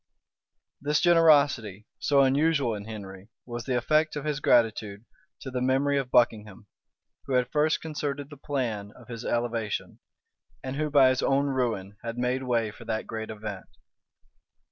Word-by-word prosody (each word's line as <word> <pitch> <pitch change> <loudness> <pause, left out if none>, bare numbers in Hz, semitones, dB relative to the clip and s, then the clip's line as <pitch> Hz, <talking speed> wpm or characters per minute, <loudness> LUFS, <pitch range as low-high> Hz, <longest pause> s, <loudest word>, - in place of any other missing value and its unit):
This 150 +2 +1
generosity, 145 - +4
so 140 -1 +3
unusual 140 -1 +2
in 105 -1 -6
Henry, 100 -2 -9 0.2
was 120 -1 -6
the 130 -2 0
effect 155 +5 +1
of 150 0 -5
his 150 -2 -1
gratitude 110 -5 +1 0.4
to 130 - -7
the 125 -1 -2
memory 135 +2 +2
of 130 -2 -4
Buckingham, 110 -4 +1 0.6
who 135 - -2
had 125 -1 +1
first 155 +1 +2
concerted 145 -2 -4
the - - -8
plan 120 -8 -3
of 120 -2 -16
his 115 0 -6
elevation, 115 -3 -2 0.6
and 130 0 -4
who 150 +1 -1
by 140 -3 +6
his 130 0 0
own 140 +1 +2
ruin 115 -8 -2
had 115 0 -5
made 125 +1 0
way 120 -4 0
for 115 - -13
that 110 -1 -2
great 110 -1 -6
event. 105 -3 -7
125 Hz, 160 wpm, -27 LUFS, 110-140 Hz, 0.6 s, by